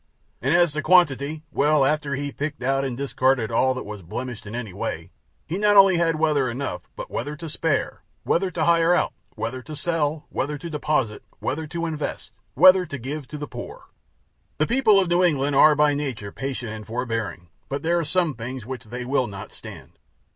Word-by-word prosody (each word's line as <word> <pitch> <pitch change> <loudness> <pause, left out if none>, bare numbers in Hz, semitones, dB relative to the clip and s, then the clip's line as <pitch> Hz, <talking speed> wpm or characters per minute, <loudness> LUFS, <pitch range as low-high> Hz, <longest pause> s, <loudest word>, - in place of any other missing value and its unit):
And 135 +5 +1
as 175 -2 +4
to 155 - -2
quantity 155 -3 +3
well, 145 -1 +3
after 150 -1 0
he 140 +2 -3
had 145 - -7
picked 145 -2 -4
out 135 +1 +1
and 130 -3 -3
discarded 130 -4 +1
all 130 +3 +2
that 130 - -5
was 105 -1 -7
blemished 120 +6 -6
in 105 - -6
any 115 -6 -5
way, 100 - -4 0.3
he 175 +5 -3
not 205 0 +4
only 195 -2 +7
had 165 -1 +2
weather 150 -5 +2
enough, 115 -9 -5
but - - -7
weather 145 +1 -3
to 165 +2 -8
spare; 155 -2 -1 0.2
weather 185 +2 +1
to 170 -3 -2
hire 170 +1 +4
out; - - +1 0.2
weather 125 +3 -4
to 155 +4 -8
sell; 155 -1 -1
to 150 +2 -1
deposit; 150 -7 -1 0.2
weather 155 +3 -3
to 170 +2 -3
invest; 155 -2 -4 0.2
weather 185 -1 +7
to 140 - -5
give 135 +3 -5
to 150 - -7
the 145 - -4
poor. - - -9 0.7
The 155 - +2
people 230 -3 +4
of 190 - +1
New 175 +1 +3
England 145 -4 +2
are 150 +2 +7
by 150 0 +4
nature 130 -8 -4
patient 130 -3 -4
and 110 -1 -8
forbearing, 115 -7 -3 0.2
but 140 +1 -3
there 170 +1 +2
are - - -1
some 165 0 +1
things 120 0 -6
which 130 -1 -7
they 125 +3 -6
will 130 -1 +1
not 100 -2 -8
stand. - - -12
145 Hz, 200 wpm, -24 LUFS, 125-160 Hz, 0.7 s, only